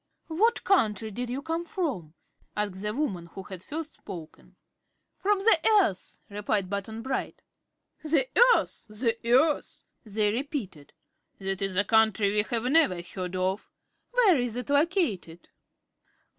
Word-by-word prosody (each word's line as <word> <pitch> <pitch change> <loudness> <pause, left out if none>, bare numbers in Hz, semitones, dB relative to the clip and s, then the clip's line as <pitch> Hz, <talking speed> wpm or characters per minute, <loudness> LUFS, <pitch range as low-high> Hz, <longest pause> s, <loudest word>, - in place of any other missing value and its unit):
"What 435 +9 +2
country 220 - +2
did 245 +4 -4
you 265 +3 -4
come 325 +2 -2
from?" 285 - -4 0.4
asked 200 -2 -2
the 210 0 -2
woman 210 - -2
who 190 +3 -9
had 185 -2 -9
first 315 0 -6
spoken. 170 -6 -11 0.6
"From 410 +1 +2
the 390 -3 +4 0.2
Earth," 195 - -1
replied 205 -1 -2
Button 220 +3 -4
Bright. 265 +1 -4 0.6
"The 300 -4 +2 0.3
Earth! - - -2
The 225 +2 0
Earth!" 265 +6 +2 0.2
they 210 -1 0
repeated. 235 - -5 0.4
"That 195 -1 -2
is 195 -1 -1
a 200 - +3
country 220 -2 +3
we 210 0 +3
have 230 +2 -2
never 265 - +3
heard 180 0 -6
of. 185 +2 -1 0.4
Where 445 - +4
is 245 -2 -2
it 250 +3 -4
located?" 285 - 0
220 Hz, 140 wpm, -27 LUFS, 195-300 Hz, 0.6 s, the